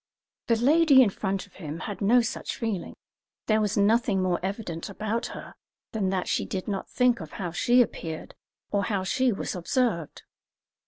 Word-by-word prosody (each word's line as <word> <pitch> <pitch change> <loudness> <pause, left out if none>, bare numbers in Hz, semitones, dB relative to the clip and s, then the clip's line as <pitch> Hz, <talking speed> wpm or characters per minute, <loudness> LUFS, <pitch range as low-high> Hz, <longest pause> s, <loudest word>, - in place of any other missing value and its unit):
The 230 - +4
lady 280 +3 +6
in 210 - +1
front 195 -1 -2
of 200 - -21
him 160 -2 -6
had 205 -1 -6
no 235 +5 +5
such 230 - -4
feeling; 220 -6 -3 0.5
there 215 0 +3
was 210 0 0
nothing 210 0 +3
more 185 -2 +1
evident 190 -2 -4
about 215 +3 -2
her - - -9 0.4
than 205 -4 0
that 185 -1 -1
she - - 0
did 185 -1 -4
not 200 -2 -3
think 250 -2 +2
of 160 -4 -9
how 180 -4 -4
she 245 +8 +4
appeared 160 -8 -7 0.4
or 200 -1 +1
how 200 -4 -1
she 255 +6 +2
was 200 - -3
observed. 180 - -1
205 Hz, 175 wpm, -27 LUFS, 185-235 Hz, 0.5 s, lady